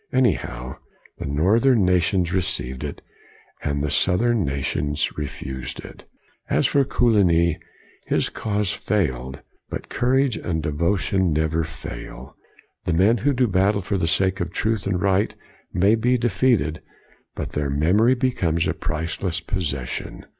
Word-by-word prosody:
Anyhow, 65 - 0 0.4
the - - -4
northern 105 - +3
nations 90 0 +2
received 65 -8 -1
it, 75 - -6 0.6
and 70 -1 -1
the 75 - -1
south 90 +7 +2
ern 120 -4 +2
nations 70 +1 -1
refused 65 -3 -5
it. - - -12 0.4
As - - +2
for 140 - +3
Coligny, 90 - +3 0.5
his - - +1
cause 105 -2 -1
failed; 65 - -2 0.3
but - - -6
courage 130 0 +1
and 80 -2 -2
devotion 85 +4 +1
never 80 +2 +1
fail. 80 - -8 0.5
The 85 - 0
men 100 +8 +4
who 145 +7 +2
do 130 -2 +2
battle 100 -1 +2
for 100 +1 -1
the 80 - +1
sake 95 +3 +1
of 85 -2 -2
truth 110 0 -1
and 95 -2 0
right 100 +2 +1 0.4
may 95 +4 +3
be 120 +3 +2
defeated, 115 - +1 0.5
but - - -4
their 75 -1 -1
memory 95 - +3
becomes 85 -11 0
a - - 0
priceless 85 +2 -2
possession. 75 -8 -4
90 Hz, 140 wpm, -23 LUFS, 75-110 Hz, 0.6 s, men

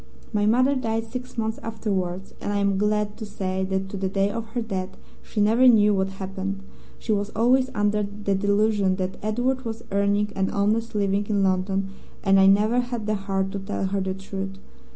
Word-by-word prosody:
My 210 0 +2
mother 255 +5 +4
died 225 -3 -1
six 250 0 -6
months 220 0 -1
afterwards, 195 -5 -3
and - - -2
I 205 - 0
am 200 -1 +1
glad 210 0 0
to 225 - -7
say 190 -2 -2
that 190 0 -1
to 200 - -5
the 190 0 -1
day 195 +1 +1
of 225 +1 -4
her 240 - +1
death 190 -3 -4 0.2
she 215 - -5
never 225 +5 +5
knew 210 -3 +6
what 190 -1 +1
happened. 195 0 -5 0.3
She 225 - -3
was 205 -1 0
always 255 +4 +3
under 205 0 +2
the 205 0 -2
delusion 200 0 +2
that 185 0 -3
Edward 245 +5 0
was 225 -1 -5
earning 200 +1 +1
an 190 0 0
honest 215 +3 0
living 200 0 +1
in 205 -2 +1
London, 190 +1 0 0.3
and 195 -1 +5
I 190 - +6
never 210 +5 +4
had 240 -3 -3
the 215 - 0
heart 195 -1 -1
to 200 - -3
tell 195 0 -3
her 195 +1 -1
the 190 0 -2
truth. 195 0 -6
205 Hz, 200 wpm, -24 LUFS, 195-220 Hz, 0.3 s, knew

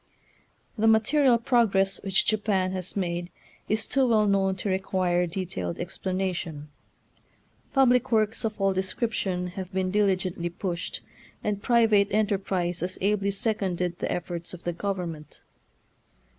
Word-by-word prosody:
The 220 - +3
material 240 +4 +4
progress 215 -5 +2
which 195 -1 +2
Japan 205 -3 +1
has 185 0 -4
made 175 -2 -2 0.4
is 215 +1 +1
too 270 -1 +2
well 220 -3 +4
known 195 -1 +2
to 190 - -5
require 185 -2 +1
de 185 +3 -3
tailed 90 - -4
explanation. 180 -4 -3 1.0
Public 255 -2 +4
works 220 0 +2
of 220 -1 -3
all 195 0 +2
description 190 -2 -2
have 185 0 -7
been 185 -1 -1
diligently 185 -4 +1
pushed, 175 0 -4 0.4
and 205 -1 -1
private 225 -4 +4
enterprise 190 -4 0
has 185 +2 -2
ably 200 0 +1
seconded 190 -4 -1
the - - -2
efforts 175 0 -4
of 175 - -15
the 175 - -2
government. 170 -5 -5
195 Hz, 130 wpm, -26 LUFS, 180-215 Hz, 1.0 s, material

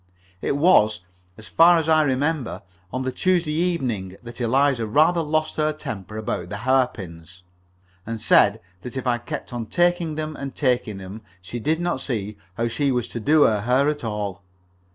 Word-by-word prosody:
It 140 - -1
was, 145 - +4 0.4
as 110 - -10
far 170 +1 +6
as 160 -1 -1
I 160 -1 +5
remember, 145 -1 -1 0.3
on 130 - -3
the 130 - -2
Tuesday 175 +2 +1
evening 130 - -1
that 120 +1 -9
Eliza 130 -1 +2
rather 160 +9 +3
lost 155 0 -1
her 155 0 +2
temper 105 - -7
about 90 -5 -4
the 100 +1 -6
hairpins, 90 -10 -1 0.6
and 115 +2 -5
said 105 0 +4 0.2
that 125 +1 -7
if 130 - -4
I 120 -1 +1
kept 120 - -7
on 120 -2 -4
taking 175 - +1
them 155 0 -4
and 135 -1 -7
taking 125 -7 0
them 95 +3 -9 0.2
she 95 +6 -7
did 155 +7 0
not 175 -6 -1
see 105 -5 -3 0.2
how 115 - 0
she 135 +5 0
was 125 -2 -1
to 120 - -5
do 150 +6 +4
her 105 -2 +2
hair 125 +5 +2
at 150 -2 -3
all. 105 -4 -4
125 Hz, 180 wpm, -23 LUFS, 110-155 Hz, 0.6 s, far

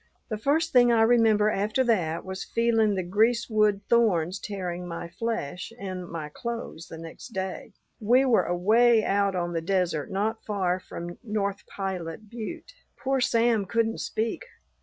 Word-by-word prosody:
"The 215 - -2
first 315 +7 +1
thing 245 -1 +6
I 225 -1 +5
remember 225 -2 +4
after 215 +6 +1
that 180 -9 0
was 190 0 -5
feeling 225 -3 +2
the 185 - -1
greasewood 215 +1 +2
thorns 195 -6 +2
tearing 180 -3 -5
my 170 0 -5
flesh 180 -3 -4
and 185 -3 -5
my 160 -3 -5
clothes 230 -1 -6
next 165 +8 -9
day. 190 +2 -4 0.3
We 245 +5 +4
were 245 -4 +3
away 220 +6 +4
out 200 -1 +1
on 175 -1 -2
the 165 - -1
desert 175 -4 0
not 215 +3 -2
far 185 -4 0
from 175 -1 -8
North 205 -3 -3
Pilot 190 0 -5
butte. 240 - -7 0.2
Poor 270 -1 0
Sam 230 -3 +2
couldn't 225 +1 0
speak. 225 - -2
210 Hz, 150 wpm, -26 LUFS, 180-230 Hz, 0.3 s, thing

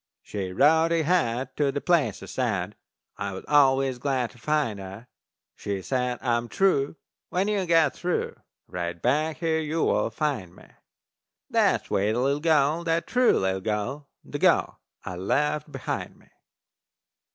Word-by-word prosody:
She 95 -3 -4
wrote 160 - +4
ahead 150 -7 +1
to 145 -2 +2
the 145 - -2
place 150 - +1
I - - -6
said, - - -2 0.4
I 100 -1 -4
was 95 - -8
always 135 -3 +3
glad 130 -3 -1
to 120 - -19
find 145 -7 0
it. 95 +4 -9 0.5
She 100 -2 -4
says, 125 0 -1
"I 120 -2 +2
am 120 0 -4
true, 165 -7 +2 0.3
when 185 +3 0
you 200 -3 0
get 165 -4 +4
through 180 0 -2 0.3
Right 85 -1 -4
back 150 - +1
here 160 -2 0
you 160 +1 -1
will - - +1
find 130 - -3
me." - - -16 0.9
That - - +2
sweet 105 +2 0
little 135 +4 +1
gal, 155 0 +2
that 165 0 +1
true 250 0 +3
little 95 0 0
gal, 110 +8 -3 0.2
The - - -5
gal - - +2 0.3
I 90 - -5
left 150 - 0
behind 135 -2 -4
me! - - -24
135 Hz, 155 wpm, -26 LUFS, 110-160 Hz, 0.9 s, wrote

